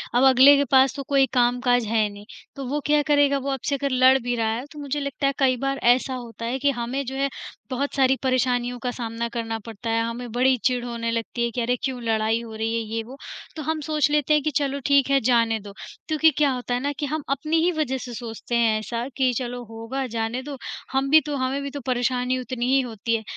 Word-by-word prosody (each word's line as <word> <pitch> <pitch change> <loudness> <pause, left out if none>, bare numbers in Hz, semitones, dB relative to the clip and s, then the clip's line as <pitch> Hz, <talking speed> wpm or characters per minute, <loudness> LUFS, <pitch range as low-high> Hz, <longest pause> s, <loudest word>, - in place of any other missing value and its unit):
अब 245 - +4
अगले 265 +2 +8
के 285 - +2
पास 265 0 +5
तो 275 - -5
कोई 275 0 +3
काम-काज 245 -1 +2
है 215 0 +1
नहीं 205 0 -12 0.3
तो 275 - -6
वो 290 +3 -1
क्या 295 0 +3
करेगा 285 -1 +3
वो 275 - -3
आपसे 270 +2 -1
अगर 280 0 -1
लड़ 255 +1 +5
भी 245 0 -1
रहा 225 -1 0
है 245 - -5
तो 300 - -10
मुझे 285 0 -3
लगता 280 0 -2
है 275 - +1
कई 260 -2 +3
बार 275 +2 -1
ऐसा 250 +2 +3
होता 235 -2 -7
है 250 +3 -2
कि 285 +1 +2
हमें 245 +2 -3
जो 265 - -5
है 275 +1 0 0.4
बहुत 275 +3 -2
सारी 265 -1 +4
परेशानियों 250 -1 +1
का 250 - -3
सामना 235 -1 -4
करना 230 -1 -3
पड़ता 225 0 -6
है, 225 0 +1
हमें 230 0 -5
बड़ी 255 +2 +3
चिढ़ 250 -1 +2
होने 230 -1 -3
लगती 230 +1 -2
है 235 - 0
कि 240 +1 -2
अरे 245 +2 +1
क्यों 260 -2 -2
लड़ाई 225 0 +1
हो 225 -2 -9
रही 225 +1 -2
है 230 - 0 0.2
ये 225 - 0
वो 255 +5 -11 0.4
तो 310 - -5
हम 315 +2 -1
सोच 300 -1 +1
लेते 300 0 +2
हैं 300 - +4
कि 305 - 0
चलो 280 -1 -1
ठीक 280 -1 +4
है 275 0 +4
जाने 230 -2 +2
दो। 200 -1 -11 0.3
क्योंकि 315 0 +4
क्या 290 -2 +3
होता 250 -1 -3
है 245 - +1
ना 285 +3 -1
कि 295 - -1
हम 305 +1 -3
अपनी 305 +4 0
ही 355 - +3
वजह 265 -4 0
से 245 -1 -7
सोचते 235 0 -5
हैं 225 -2 +3
ऐसा 230 +3 -4
कि 260 -2 +3
चलो 245 -1 -4
होगा 230 +4 -4
जाने 230 +1 -3
दो 285 -1 -7 0.3
हम 270 +1 0
भी 310 +2 +7
तो 295 -1 -3
हमें 260 +2 -1
भी 280 - -4
तो 285 - -5
परेशानी 250 0 0
उतनी 250 -1 -3
ही - - +5
होती 230 -1 -2
है। 220 - -3
255 Hz, 250 wpm, -24 LUFS, 235-275 Hz, 0.4 s, अगले